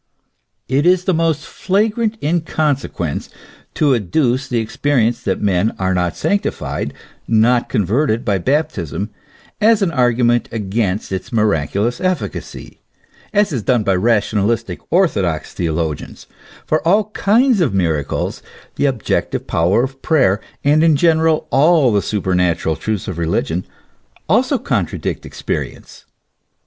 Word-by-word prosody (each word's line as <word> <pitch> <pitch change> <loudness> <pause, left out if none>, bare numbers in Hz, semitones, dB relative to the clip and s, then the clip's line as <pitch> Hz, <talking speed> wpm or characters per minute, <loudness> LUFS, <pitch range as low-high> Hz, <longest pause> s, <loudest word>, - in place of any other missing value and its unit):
It 140 +5 +1
is 180 0 +4
the 185 - +1
most 160 -2 0
flagrant 215 +3 0
inconsequence 150 - -1 0.5
to 145 -3 +3
adduce 125 - 0
the 115 -3 -1
expe 135 +6 -1
rience 115 -1 +2
that 95 - -2
men 100 +1 +1
are 95 0 0
not 90 -2 -1
sanctified, 200 0 -2 0.3
not 120 +2 +3
converted 115 - 0
by 100 -4 +1
baptism, 105 - -1 0.5
as 215 -1 +4
an 180 - +1
argument 120 -3 +2
against 105 -2 -2
its 95 -1 -4
miraculous 105 - 0
efficacy, 185 -1 -4 0.5
as 205 -4 +2
is 125 - -1
done 120 +1 +1
by 100 -2 +2
rationalistic 110 +2 0
orthodox 95 - +1
theologians 80 -3 -3
;J - - -33 0.3
for 155 - +1
all 205 +3 +3
kinds 230 +2 +3
of 155 - +2
miracles, 80 -7 -1 0.4
the 145 - +2
objective 125 -5 -1
power 90 +8 +2
of 135 0 -5
prayer, 115 - +2 0.2
and 150 +3 +4
in 160 -2 +5
general 160 +1 +2
all 140 -2 +4
the 100 - +3
superna 90 -5 0
tural 80 -1 -2
truths 110 -3 -3
of 90 -3 -4
religion, 85 +1 -1 0.6
also - - +2
contradict - - -2
experience. - - -6
120 Hz, 130 wpm, -18 LUFS, 95-160 Hz, 0.6 s, in